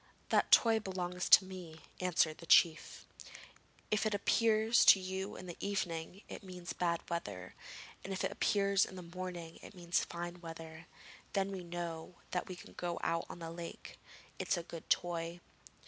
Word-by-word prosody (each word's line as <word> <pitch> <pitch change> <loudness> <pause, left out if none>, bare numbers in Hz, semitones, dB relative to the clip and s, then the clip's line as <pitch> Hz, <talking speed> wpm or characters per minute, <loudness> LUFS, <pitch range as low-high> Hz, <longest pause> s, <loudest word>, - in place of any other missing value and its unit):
'That - - +2
toy 225 -1 +6
belongs 180 -3 -3
to 190 - +9
me,' 180 -4 -9 0.2
answered 170 -3 +1
the 170 - -11
chief. 165 -1 +4 0.9
'If 215 - +2
it 215 -2 +1
appears 220 +2 +4
to 195 - +9
you 190 +1 -4
in 185 - -8
the 175 -2 -8
evening 180 -2 -3
it - - -8
means 180 -2 -7
bad 170 -1 -1
weather, 100 - -4 0.5
and 195 - -6
if 190 - -2
it - - 0
appears 200 -1 +2
in - - -5
the 180 - -7
morning 175 -1 -7
it - - -12
means 175 -1 0
fine 175 0 -6
weather. 165 -1 -9 0.5
Then 195 -1 +1
we 190 -2 -5
know 170 0 -5 0.2
that 180 - -1
we 185 - -6
can 180 - -13
go 175 -1 -3
out 165 0 0
on - - -7
the 165 -1 -6
lake. 170 0 -8 0.4
It - - -3
is - - +2
a 170 - -3
good 165 -1 -10
toy.' 170 0 0
175 Hz, 180 wpm, -34 LUFS, 170-190 Hz, 0.9 s, to